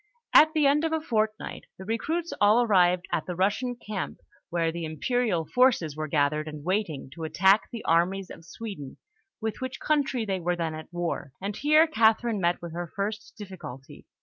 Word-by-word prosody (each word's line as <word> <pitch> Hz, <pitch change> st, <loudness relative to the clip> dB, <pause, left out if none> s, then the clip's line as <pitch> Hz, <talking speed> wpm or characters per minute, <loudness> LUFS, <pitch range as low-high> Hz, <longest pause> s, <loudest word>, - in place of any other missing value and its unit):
At 310 Hz, +1 st, +7 dB
the 305 Hz, -2 st, +3 dB
end 290 Hz, +2 st, +4 dB
of 325 Hz, -, 0 dB
a 320 Hz, -, +1 dB
fortnight, 220 Hz, -7 st, -2 dB
the 190 Hz, -, -9 dB
recruits 320 Hz, -, -2 dB
all 215 Hz, +4 st, +5 dB
arrived 180 Hz, -5 st, +3 dB
at 160 Hz, -, -1 dB
the 180 Hz, -, -3 dB
Russian 210 Hz, +7 st, 0 dB
camp, 210 Hz, -5 st, -5 dB, 0.3 s
where 165 Hz, -1 st, 0 dB
the 170 Hz, 0 st, -5 dB
imperial 180 Hz, +2 st, -1 dB
forces 240 Hz, -, +2 dB
were 155 Hz, 0 st, -3 dB
gathered 150 Hz, +1 st, +1 dB
and 150 Hz, -1 st, -7 dB
waiting 175 Hz, -7 st, -2 dB
to 165 Hz, -, -8 dB
attack 190 Hz, +6 st, +3 dB
the 235 Hz, -, -7 dB
armies 180 Hz, +3 st, +1 dB
of 165 Hz, -, -11 dB
Sweden, 170 Hz, -5 st, -8 dB, 0.4 s
with 220 Hz, +1 st, -3 dB
which 260 Hz, 0 st, -4 dB
country 275 Hz, -6 st, 0 dB
they 190 Hz, -2 st, -1 dB
were 175 Hz, +1 st, 0 dB
then 165 Hz, -2 st, -2 dB
at 155 Hz, +2 st, -9 dB
war; 175 Hz, -6 st, -3 dB
and 200 Hz, +1 st, -4 dB
here 305 Hz, +5 st, +5 dB
Catherine 225 Hz, -5 st, +2 dB
met 175 Hz, 0 st, 0 dB
with 170 Hz, -1 st, -6 dB
her 175 Hz, 0 st, -4 dB
first 210 Hz, +1 st, -4 dB
difficulty. 180 Hz, -, -10 dB
195 Hz, 185 wpm, -27 LUFS, 165-235 Hz, 0.4 s, At